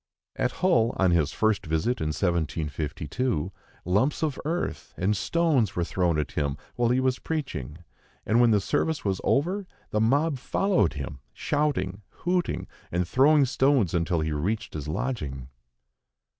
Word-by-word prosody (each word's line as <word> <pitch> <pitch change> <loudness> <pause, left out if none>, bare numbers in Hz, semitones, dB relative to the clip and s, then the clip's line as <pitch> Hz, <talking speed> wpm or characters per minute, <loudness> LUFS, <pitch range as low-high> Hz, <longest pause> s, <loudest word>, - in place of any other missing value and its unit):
At - - 0
Hull, 120 -10 +3
on 95 -2 +3
his 80 -3 +2
first 110 -4 +1
visit 80 +10 0
in 80 - 0
1752, 80 - -1 0.3
lumps 105 - +1
of 150 -4 -1
earth 155 - -3
and 100 +4 +1
stones 135 - +1
were 85 - +1
thrown 85 -2 +1
at 75 - -2
him 70 -1 -1 0.2
while 120 -1 +2
he 125 +1 +3
was 130 0 +1
preaching; 85 - -4 0.4
and 115 +3 +3
when 120 - +6
the 105 -2 +4
service 155 +9 -1
was 95 -2 0
over, 180 +7 +1 0.2
the 105 - +1
mob 140 +5 +2
followed 160 - +1
him, 70 -1 -6
shouting, 145 -10 -1 0.2
hooting, 180 0 0 0.3
and 90 0 0
throwing 140 - +5
stones 130 - +2
until 85 -1 +1
he 80 0 -1
reached 105 +9 -2
his 75 -2 -5
lodging. 75 - -3
105 Hz, 150 wpm, -26 LUFS, 80-135 Hz, 0.4 s, when